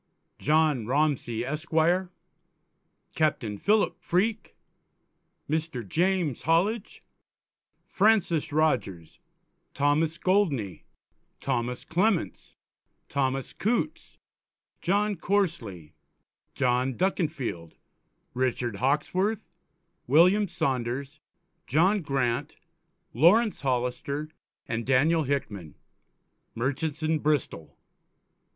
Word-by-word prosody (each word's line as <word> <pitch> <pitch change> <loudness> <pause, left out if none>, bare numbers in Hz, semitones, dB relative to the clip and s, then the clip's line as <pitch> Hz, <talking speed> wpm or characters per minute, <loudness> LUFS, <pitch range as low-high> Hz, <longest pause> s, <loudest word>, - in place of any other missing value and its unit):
_, - - -16
John 150 -6 +2
Romsey 130 -4 0
Esq.; 150 +5 -5 1.4
Capt. 155 -5 +1
Philip 210 +1 +1
Freake, 210 +5 -1 0.9
Mr. 155 -7 -3
James 175 - 0
Hollidge, 190 +7 0 0.8
Francis 195 -8 +2
Rogers, 120 - -1 0.6
Thomas 150 +3 +1
Goldney, 160 - 0 0.5
Thomas 120 +1 -2
Clements, 185 +2 -1 0.5
Thomas 135 -1 -1
Coutes, 245 +8 -2 0.6
John 205 +2 +1
Corsely, 125 - -2 0.6
John 125 0 +1
Duckinfield, 140 - -2 0.6
Richard 125 -3 -1
Hawksworth, 180 - 0 0.6
William 180 +9 +5
Saunders, 135 0 -2 0.5
John 185 +7 +3
Grant, 135 -6 -1 0.6
Laurence 195 - +4
Hollister, 135 +3 -2 0.4
and 115 0 -2
Daniel 145 +6 +3
Hickman, 105 - -3 0.8
Merchants 145 +6 -2
in 155 0 +1
Bristol. 145 - -2
150 Hz, 75 wpm, -27 LUFS, 125-180 Hz, 1.4 s, William